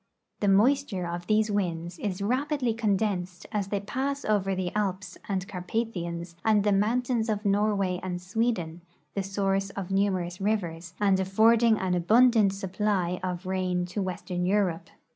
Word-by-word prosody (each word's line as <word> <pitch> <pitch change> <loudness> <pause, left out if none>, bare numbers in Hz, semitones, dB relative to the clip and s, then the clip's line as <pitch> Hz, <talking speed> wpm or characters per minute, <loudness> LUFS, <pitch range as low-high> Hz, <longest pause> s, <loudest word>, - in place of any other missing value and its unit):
The 205 - 0
moisture 210 -1 +3
of 175 +1 -5
these 215 0 +2
Avinds 175 -3 -2
is 200 -1 -3
rapidly 255 +2 0
condensed 200 -5 -1
as 205 -2 -1
they 200 0 -1
pass 275 +7 -3
over 195 -2 +1
the 185 0 -3
Alps 190 -3 -2
and 190 -1 -1
Carpathians 175 -3 -4
and 215 -2 +3
the 205 - +2
mountains 230 +3 +1
of 210 -1 -1
Noiavay 200 -3 +1
and 180 -1 -4
SAveden, 180 -4 -1 0.3
the 200 - -1
source 195 0 -1
of 195 -1 -6
numerous 185 -2 0
rivers, 180 -5 -2
and 195 -2 +3
affording 220 +4 +4
an 185 -2 -1
abundant 220 +4 +4
supply 190 -2 -1
of 180 0 -4
rain 185 -1 -1
to 205 - -1
Avestern 180 -1 -3
Europe. 190 -4 0
195 Hz, 150 wpm, -27 LUFS, 180-215 Hz, 0.3 s, affording